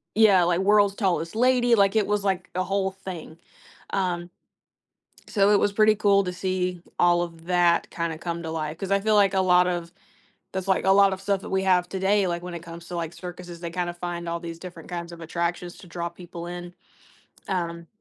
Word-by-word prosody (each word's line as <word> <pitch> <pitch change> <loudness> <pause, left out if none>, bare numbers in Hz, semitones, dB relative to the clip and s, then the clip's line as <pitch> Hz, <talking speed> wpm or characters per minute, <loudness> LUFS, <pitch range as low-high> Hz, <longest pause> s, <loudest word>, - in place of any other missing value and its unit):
Yeah, 205 -5 +6
like, 175 +1 +1
world's 205 0 +4
tallest 185 -3 -1
lady, 245 0 +4
like, 200 0 +3
it 215 - +3
was, 210 -1 0
like, 190 -2 -1
a 185 - +1
whole 195 +1 -1
thing, 185 -4 -9 0.5
um 180 -2 -1 1.0
So, 200 -1 +3
it 205 - +5
was 205 - +2
pretty 215 +1 +5
cool 200 -1 +4
to 180 - -3
see 180 -1 -2 0.2
all 175 0 +4
of 165 -1 -7
that 175 -1 +3
kinda 165 -2 -3
come 170 0 -4
to 165 - -5
life, 155 0 -4
'cause 195 0 -5
I 200 - +4
feel 215 +2 +2
like 200 -2 +4
a 190 - +3
lot 180 -1 +4
of 170 -1 -3 0.6
that's, 190 0 -4
like, 190 - +2
a 190 - +4
lot 195 0 +6
of 190 - -4
stuff 195 0 0
that - - -8
we 190 0 +1
have 180 -2 +3
today, 195 +1 +1
like, 175 -1 -2
when 180 0 -6
it 170 - -5
comes 170 0 -10
to, 175 - -5
like, 165 -1 -3
circuses, 180 -1 -9
they 170 -1 -5
kind 175 0 -2
of 175 - -10
find 175 -1 -4
all 170 0 -2
these 170 -1 -7
different 175 -3 -10
kinds 170 -1 -5
of 170 - -10
attractions 170 +1 -3
to - - -13
draw 170 0 -4
people 170 0 -9
in. 175 0 -7 0.7
Um 170 -3 -3
180 Hz, 220 wpm, -25 LUFS, 170-195 Hz, 1.0 s, Yeah